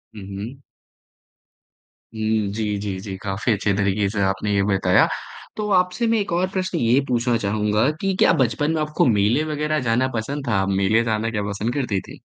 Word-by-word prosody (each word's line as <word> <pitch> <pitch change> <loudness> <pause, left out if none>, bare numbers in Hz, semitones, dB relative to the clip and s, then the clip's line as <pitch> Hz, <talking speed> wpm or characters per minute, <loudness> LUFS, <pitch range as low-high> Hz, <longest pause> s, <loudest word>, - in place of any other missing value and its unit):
हुँ, 105 - -8
हुँ। 105 +7 -7 1.6
हुँ, 110 -1 0
जी, 105 -2 -2
जी, 100 -2 -4
जी, 95 0 -6
काफ़ी 100 +4 -1
अच्छे 100 0 0
तरीके 100 0 +1
से 100 0 -2
आपने 95 +2 -1
ये 100 - +2
बताया। 95 -2 +3 0.5
तो 210 -1 -2
आपसे 180 +6 -1
मैं 225 0 +2
1 200 - -3
और 180 +2 +1
प्रश्न 185 -2 -1
ये 120 -2 +3
पूछना 120 -1 +1
चाहूँगा 105 +3 +1
कि 195 0 0
क्या - - +5
बचपन 130 +5 +1
में 155 - 0
आपको 150 0 +1
मेले 110 +5 +3
वगैरह 150 +1 0
जाना 125 +3 +2
पसंद 135 +5 -4
था? 120 - +1
आप 95 - -1
मेले 100 +4 +2
जाना 110 0 -1
क्या 105 -2 -2
पसंद 105 +4 -2
करती 125 -8 -1
थी? - - -13
110 Hz, 190 wpm, -22 LUFS, 100-140 Hz, 1.6 s, क्या